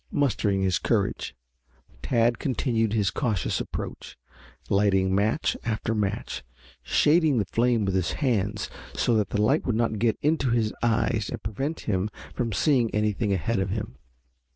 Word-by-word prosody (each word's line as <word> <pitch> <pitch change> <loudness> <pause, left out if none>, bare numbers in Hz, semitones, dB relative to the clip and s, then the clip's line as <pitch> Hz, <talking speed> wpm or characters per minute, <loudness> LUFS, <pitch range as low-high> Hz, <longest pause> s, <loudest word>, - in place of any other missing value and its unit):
Mustering 105 - +1
his 95 -2 +1
courage, 60 - -1 0.7
Tad 120 -1 +2
continued 115 -4 0
his 105 -4 +1
cautious 110 - -1
approach, - - -6 0.5
lighting 95 -1 +2
match 105 +10 +1
after 110 0 -1
match, 100 - -2 0.4
shading 150 - +3
the 105 - +1
flame 115 +1 +1
with 95 - 0
his 95 -2 0
hands 105 -7 0 0.3
so 120 - +2
that 105 -2 +1
the 105 - -1
light 130 +9 +3
would 120 - +1
not 115 -2 0
get 115 -1 +2
into 150 -3 +2
his 115 -2 +1
eyes 115 -2 +1
and - - -6
prevent 135 +10 -3
him 100 -1 -1 0.2
from 120 -2 -2
seeing 125 +1 +2
anything 105 0 0
ahead 95 +4 0
of 95 0 -1
him. 105 +2 -4
110 Hz, 150 wpm, -26 LUFS, 100-120 Hz, 0.7 s, shading